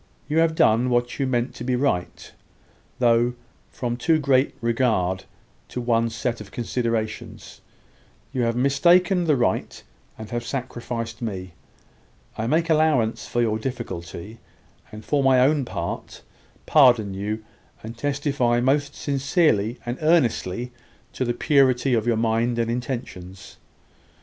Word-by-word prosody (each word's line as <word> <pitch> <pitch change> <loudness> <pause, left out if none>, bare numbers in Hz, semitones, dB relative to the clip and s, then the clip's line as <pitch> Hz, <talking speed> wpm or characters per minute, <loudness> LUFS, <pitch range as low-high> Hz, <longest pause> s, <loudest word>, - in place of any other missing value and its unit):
You 155 +2 +1
have 165 -1 +2
done 120 -2 +3
what 120 +1 0
you 135 - +1
meant 120 -1 -1
to - - -8
be 125 0 0
right; 125 -9 -2 0.7
though, 120 0 +3 0.3
from 120 -1 -3
too 160 +6 +2
great 140 -2 +2
regard 115 -6 0 0.4
to - - -5
one 115 -1 +1
set 115 0 -3
of 100 - -10
considerations, 115 -2 -4 0.7
you 130 - -1
have 115 -1 +1
mistaken 175 +8 +3
the 155 -3 +3
right, 120 -2 -1 0.3
and 110 - -8
have 120 0 -2
sacrificed 120 -2 -5
me. 95 -6 -5 0.8
I 110 - -3
make 165 +5 +1
allowance 155 -8 +2
for 120 - 0
your 110 -1 0
difficulty, 110 -4 -6 0.5
and, 110 0 -10
for 145 -1 +1
my 130 -1 +5
own 140 +1 +3
part, 85 -6 -6 0.4
pardon 120 -9 +4
you, 105 +3 -4 0.4
and 115 +2 -7
testify 135 -2 0
most 140 +3 +1
sincerely 135 - +1
and 120 +1 -4
earnestly 125 - +1 0.4
to 130 - -2
the 120 - 0
purity 135 -1 +3
of 115 -1 +1
your 115 -2 +2
mind 115 +1 +1
and 115 0 0
intentions. 110 -7 -6
120 Hz, 135 wpm, -23 LUFS, 115-135 Hz, 0.8 s, my